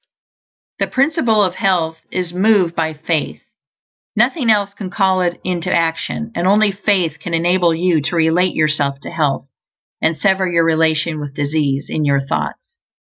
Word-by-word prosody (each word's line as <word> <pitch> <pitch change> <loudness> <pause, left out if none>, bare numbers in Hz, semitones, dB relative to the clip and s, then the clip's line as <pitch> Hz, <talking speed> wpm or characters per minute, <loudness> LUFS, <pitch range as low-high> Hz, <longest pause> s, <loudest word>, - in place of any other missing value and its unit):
The - - +1
Principle 260 -7 +2
of 185 -2 0
Health 165 -5 0
is 180 -2 -3
moved 190 -2 +3
by 160 -2 -2
Faith; 155 0 -3 0.7
nothing 265 -9 +1
else 200 -2 +2
can 200 -2 -7
call 190 -1 +1
it 175 -1 -1
into 175 -2 -2
action, 170 +7 -1
and 175 -2 -1
only 205 +1 +4
faith 190 -6 0
can 170 +1 -3
enable 175 +1 +2
you 170 -2 +1
to 160 +5 -3
relate 165 +3 +2
yourself 150 -3 +1
to - - -8
health, 140 -4 -1 0.5
and 160 0 +1
sever 190 -2 +1
your 165 -1 +3
relation 160 0 +1
with 145 -2 -7
disease, 145 -1 -1
in 155 - -2
your 140 -1 +2
thoughts. 135 - -3
170 Hz, 160 wpm, -17 LUFS, 155-190 Hz, 0.7 s, only